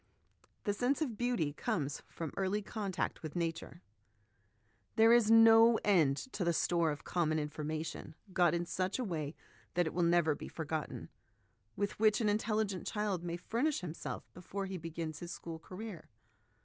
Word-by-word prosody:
The 205 - +1
Sense 250 +6 +1
of 245 -7 -4
Beauty 235 -11 0
comes 145 -1 -2
from 165 -4 -5
Early 195 +2 0
Con 205 -1 -4
tact 185 - -2
with 155 0 -7
Nature. 165 -2 -3 1.1
There 225 +1 +7
is 235 -3 +5
no 225 0 +8
end 160 -9 +4 0.2
to 195 - -1
the 170 -1 +2
store 170 0 +2
of 145 -1 -4
common 160 -3 0
information, 155 +1 -4 0.2
got 175 -3 +4
in 170 0 -1
such 185 +2 -1
a 255 - -1
way 160 -7 -3 0.4
that 175 0 +3
it 160 - -3
will 175 - 0
never 170 -2 +4
be - - -7
forgotten, 155 -6 -4 0.7
with 205 +1 -2
which 215 -1 +4
an 220 -3 +2
intelligent 210 -2 0
child 205 -5 -1
may 170 0 -3
furnish 240 - 0
himself 170 -2 -6
before 195 +2 -5
he 190 -1 -4
begins 160 -1 -5
his 175 0 -6
school 165 -2 -7
career. 185 0 -8
175 Hz, 165 wpm, -34 LUFS, 160-210 Hz, 1.1 s, no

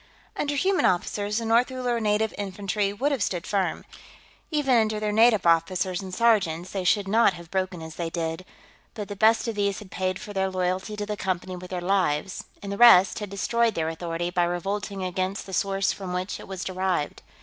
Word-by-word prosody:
Under 290 0 -1
human 375 +6 +2
officers, 205 +3 0
the 230 - -2
North 230 +3 +3
Uller 250 -2 -1
Native 215 0 +1
Infantry 200 0 -2
would 260 +9 -1
have 275 -5 -1
stood 180 -3 -1
firm. 195 -2 -1 0.6
Even 290 -5 +2
under 220 -2 +2
their 210 0 -1
native 220 -2 +4
officers 175 +2 +2
and 190 -1 -7
sergeants, 185 -5 +1
they 195 -2 -3
should 195 +2 +2
not 220 0 +4
have 170 -1 -12
broken 185 -3 -2
as 160 -1 -9
they 170 -1 -2
did, 165 +1 -3 0.5
but 210 -2 -6
the 205 - -5
best 220 +2 +3
of 230 - -1
these 200 -2 0
had 200 -3 -11
paid 185 0 -1
for 205 - -9
their 190 -1 0
loyalty 185 +2 -2
to 210 0 -3
the 210 0 -3
Company 185 -1 -3
with 180 0 -9
their 180 -1 -3
lives, 185 -2 0 0.2
and 200 - -5
the 200 - -4
rest 195 -6 +7
had 210 -2 -5
destroyed 230 +4 +1
their 160 -1 -1
authority 170 +1 -3
by 175 -1 +2
revolting 195 +3 -3
against 185 +2 -2
the 190 - -9
source 195 +1 +1
from 185 -2 -6
which 180 +2 -3
it - - -11
was 190 -2 -5
derived. 185 -4 -2
195 Hz, 205 wpm, -25 LUFS, 180-215 Hz, 0.6 s, rest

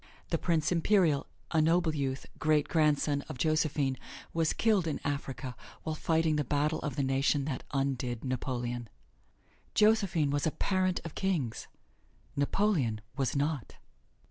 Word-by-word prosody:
The 165 - +1
Prince 165 -2 +1
Imperial 170 -4 +3 0.2
a 160 - +3
noble 165 0 +3
youth 135 -2 -2
great 155 -2 +3
grandson 150 -2 +2
of - - -5
Josephine, 150 -2 +1 0.4
was 165 -1 +2
killed 210 -6 +2
in 155 - -2
Africa 135 -3 -3 0.3
while 160 - -2
fighting 160 0 +1
the 150 - +1
battle 150 +3 0
of 145 - -4
the 140 - 0
nation 135 +1 +2
that 135 -4 -3
undid 135 -3 -1
Napoleon. 120 -2 -3 0.9
Josephine 200 -9 +3
was 145 +2 +1
a - - +1
parent 185 +1 0
of 165 - -6
kings: 165 - -1 0.7
Napoleon 140 - +1
was 135 -2 0
not. 145 -3 -1
150 Hz, 140 wpm, -31 LUFS, 135-165 Hz, 0.9 s, Imperial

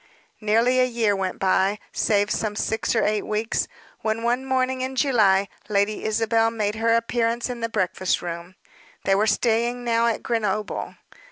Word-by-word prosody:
Nearly 230 +4 +2
a - - +5
year 230 -4 +1
went 190 -1 -2
by, 190 +1 +2
save 205 -1 +1
some 215 -1 -1
six 220 +2 -1
or 220 - +2
eight 210 -1 +1
weeks, 215 +1 -1 0.3
when, 220 +1 -2
one 245 +3 0
morning 260 0 0
in 260 +1 -3
July, 210 -8 +3 0.2
Lady 205 +1 0
Isabel 225 +1 +2
made 215 -2 -1
her 230 +1 +2
appearance 230 +1 0
in 245 - -6
the 230 0 -2
breakfast 185 -3 0
room. 170 +1 -7 0.5
They 195 - +2
were 205 +3 +2
staying 235 +2 +1
now 235 -1 +2
at 230 - -1
Grenoble. 215 -3 -2
225 Hz, 165 wpm, -24 LUFS, 205-235 Hz, 0.5 s, a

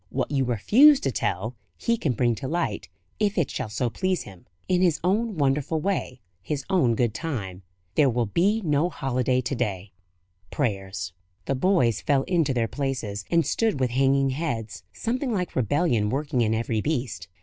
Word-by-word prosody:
What - - -2
you 135 -2 +1
refuse 230 - +6
to - - 0
tell, - - -2 0.2
He 235 - +1
can 155 - -1
bring 120 +1 +2
to 115 +4 -5
light, 170 +4 -2 0.3
if 205 -1 +1
it 165 -7 +1
shall 110 - -4
so 120 +3 -1
please 185 +3 -1
Him, 95 -4 -14 0.2
in 180 -1 +2
His 175 -4 +3
own 210 +2 0
wonderful 145 +2 +1
way, 150 -8 -2 0.2
His 135 +7 -4
own 130 -12 +3
good 120 -2 +1
time. 110 - -4 0.3
There 145 -3 +4
will 120 -1 0
be 200 - +1
no 150 +2 +2
holiday 130 -4 0
to 130 +3 -3
day. 105 -6 -3 0.6
Prayers." 95 - -3 0.3
The - - 0
boys 130 - +2
fell 140 -2 +2
into 165 -5 +1
their 120 -3 +1
places, 120 -8 -3
and 170 -1 +3
stood 220 -10 0
with 125 -2 +1
hanging 135 +1 +3
heads, 115 - -3
something 250 +3 -2
like 180 -5 -2
rebellion 120 - +1
working 135 0 -1
in 110 -1 +2
every 110 -1 -1
breast. 125 - -2
135 Hz, 175 wpm, -25 LUFS, 115-170 Hz, 0.6 s, refuse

